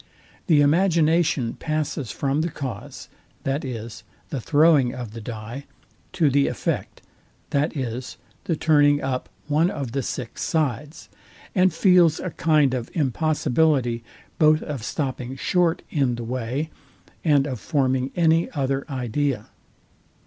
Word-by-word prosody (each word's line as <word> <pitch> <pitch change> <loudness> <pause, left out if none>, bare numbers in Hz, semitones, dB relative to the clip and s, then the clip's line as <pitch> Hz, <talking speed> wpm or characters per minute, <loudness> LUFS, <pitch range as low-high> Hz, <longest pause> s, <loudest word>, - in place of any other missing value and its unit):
The 155 -5 +5
imagination 160 -5 +3
passes 155 -5 -3
from 140 +2 -1
the 170 - -1
cause, 135 -5 -7 0.4
viz. 120 -5 -4 0.3
the 135 - -3
throwing 145 -3 +4
of 120 -4 -6
the 115 +1 -8
dye, 115 +4 -7 0.5
to 155 -5 +3
the 140 +1 +3
effect, - - -3 0.5
viz. 130 -4 -2 0.3
the 165 - 0
turning 145 -2 +4
up 130 -1 -2 0.2
one 155 +4 +3
of 140 -9 -4
the 135 +2 -1
six 125 -1 -5
sides; 150 -1 -2 0.5
and 185 -2 +4
feels 180 -5 +4
a 180 - -4
kind 150 -5 +2
of 125 -2 -3
impossibility 145 -4 +1 0.4
both 155 0 +5
of 140 -7 -5
stopping 130 -1 -3
short 175 +4 +1
in 135 -5 +1
the 120 - -6
way, 130 +6 -3 0.5
and 145 -4 +4
of 130 -5 -4
forming 130 -2 0
any 165 -1 +3
other 135 -1 -1
idea. 130 -2 -2
140 Hz, 125 wpm, -23 LUFS, 125-155 Hz, 0.5 s, The